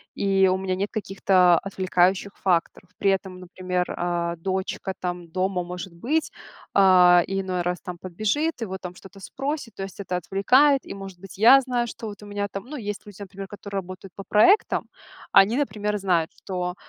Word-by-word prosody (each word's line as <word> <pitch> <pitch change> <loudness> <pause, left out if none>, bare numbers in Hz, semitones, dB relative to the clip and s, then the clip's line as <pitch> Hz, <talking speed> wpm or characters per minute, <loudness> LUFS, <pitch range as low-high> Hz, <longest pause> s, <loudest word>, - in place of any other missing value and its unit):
и 195 -1 +3
у 185 - +2
меня 190 -1 -2
нет 200 +2 -3
каких-то 190 -4 +3
отвлекающих 190 0 0
факторов". 180 0 -1
При 195 - +2
этом, 190 -1 -3
например, 180 0 -3
а, 170 -1 -1
дочка 190 +2 -3
там 175 -1 -4
дома 185 +1 -1
может 180 0 -7
быть, 290 - -1 0.4
а, 180 -2 +6
иной 190 -2 -2
раз 180 0 -2
там 180 -2 -7
подбежит 215 - -2
и - - -1
вот 190 -2 -6
там 180 -1 -8
что-то 195 +2 -14
спросит. 270 +3 -5
То 195 - -5
есть 195 0 -9
это 185 -2 -3
отвлекает. 255 - +3
И, - - -7
может 195 -2 -9
быть, 195 0 -12
я 240 +6 +8
знаю, 245 -2 -1
что 225 0 -7
вот 205 -1 -9
у - - -10
меня 205 0 -3
там, 195 - -5
ну, 295 +4 -7
есть 205 -4 -5
люди, 205 -2 -13
например, 195 0 -8
которые 200 -1 -5
работают 185 0 -10
по 195 - -8
проектам. 220 - +3 0.5
Они, 200 +5 +6
например, 210 -7 -1
знают, 180 -5 0
что, 180 -2 -4
195 Hz, 185 wpm, -24 LUFS, 180-205 Hz, 0.5 s, я